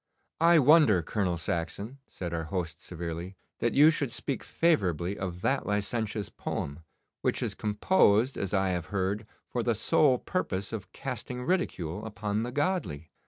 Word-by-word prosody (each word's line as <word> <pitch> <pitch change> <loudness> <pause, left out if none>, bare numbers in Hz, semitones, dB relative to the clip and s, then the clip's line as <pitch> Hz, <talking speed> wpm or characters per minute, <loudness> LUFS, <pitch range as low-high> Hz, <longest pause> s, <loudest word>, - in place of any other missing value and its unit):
'I 170 +1 +6
wonder, 145 - +6
Colonel 90 -1 -1
Saxon,' 95 +10 -4
said 85 -2 -6
our 80 -1 -2
host 85 -2 -4
severely, 85 +2 -6 0.2
'that 120 - 0
you 150 +3 +8
should 145 -6 -2
speak 135 +2 -3
favourably 95 - +1
of 90 -3 -5
that 135 - 0
licentious 105 0 -1
poem, 70 +3 -4 0.4
which - - 0
is - - -1
composed, 110 - +3
as 100 -2 -3
I 95 -1 +2
have 90 -3 -2
heard, 100 +2 -1 0.2
for 120 - -2
the 115 0 +1
sole 130 +5 +4
purpose 100 - -3
of 95 -4 -6
casting 125 -1 -5
ridicule 100 - -1
upon 105 0 -2
the 120 +2 -3
godly. 120 - -1
105 Hz, 155 wpm, -29 LUFS, 90-125 Hz, 0.4 s, you